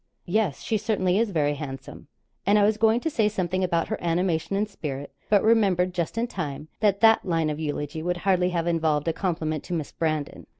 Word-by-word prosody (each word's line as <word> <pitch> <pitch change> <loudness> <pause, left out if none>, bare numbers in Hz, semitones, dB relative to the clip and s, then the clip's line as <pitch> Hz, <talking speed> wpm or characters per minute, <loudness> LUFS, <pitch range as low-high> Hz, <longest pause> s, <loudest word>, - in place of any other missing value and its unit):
'Yes, 190 -5 0
she 220 - 0
certainly 200 -3 +1
is 230 -1 +1
very 150 -5 +1
handsome,' 135 -2 -8 0.4
and 205 +2 +4
I 205 - +4
was 215 +1 +2
going 225 +2 +3
to 320 - -1
say 220 -6 +2
something 185 -2 -1
about 170 -2 0
her - - -2
animation 170 +1 0
and 210 +2 0
spirit, 140 -8 -6 0.2
but 205 -2 +4
remembered 195 -5 +3
just 175 +3 -3
in 230 - +1
time, 155 - -5
that 205 -2 +2
that 225 -1 +6
line 165 -4 0
of 150 - -5
eulogy 150 0 -3
would 175 +2 -1
hardly 180 -1 +2
have 170 -2 -1
involved 160 -3 +1
a 165 - +2
compliment 160 -5 -2
to - - -5
Miss 155 -3 -4
Brandon. 155 -3 -3
175 Hz, 210 wpm, -25 LUFS, 155-205 Hz, 0.4 s, that